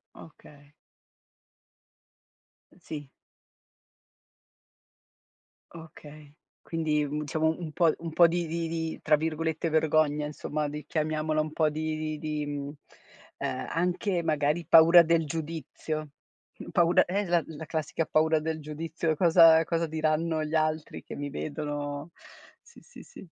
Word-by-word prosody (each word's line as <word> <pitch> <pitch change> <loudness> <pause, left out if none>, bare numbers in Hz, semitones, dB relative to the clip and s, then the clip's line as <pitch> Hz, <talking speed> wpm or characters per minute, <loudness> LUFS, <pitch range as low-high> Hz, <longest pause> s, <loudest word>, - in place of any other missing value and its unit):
Okay. 145 -2 -16 2.1
Sì. 145 -3 -8 2.6
Okay, 155 -3 -13 0.3
Quindi, 155 -2 -1
mhmm, 145 +1 -3
diciamo, 160 +2 0
un 165 -3 -6 0.4
po' 170 +1 +7
di 170 +1 -1
di 165 +1 -3
di 160 0 -4
tra 155 - +4
virgolette 160 +1 -2
"vergogna," 155 -1 +2
insomma, 150 0 -3
di 150 0 -7
chiamiamola 155 0 -1
un 155 0 -2
po' 155 -1 +2
di 155 +1 -3
di 155 0 -3
di, 150 -1 -3
mhmm, 145 -1 -5 0.7
ehm, - - -3
anche, 180 +2 -1
magari 155 +1 0
paura 165 +1 +8
del 165 -1 +2
giudizio. 155 0 -5 0.6
Paura 170 0 +4
è 180 - -6
esa 205 -3 -3 0.2
la 160 - -9
la 160 +2 -7
classica 160 0 -2
paura 160 +1 +2
del 160 0 -3
giudizio: 155 +1 -3
"Cosa 165 -1 +6
cosa 165 +1 -1
diranno 155 +1 0
gli 155 +1 -3
altri 155 0 -1
che - - -8
mi 145 0 -5
vedono?" 145 +1 -5 0.5
Sì, 470 - -19
sì, 485 - -14
sì. - - -13
155 Hz, 125 wpm, -28 LUFS, 150-165 Hz, 2.6 s, paura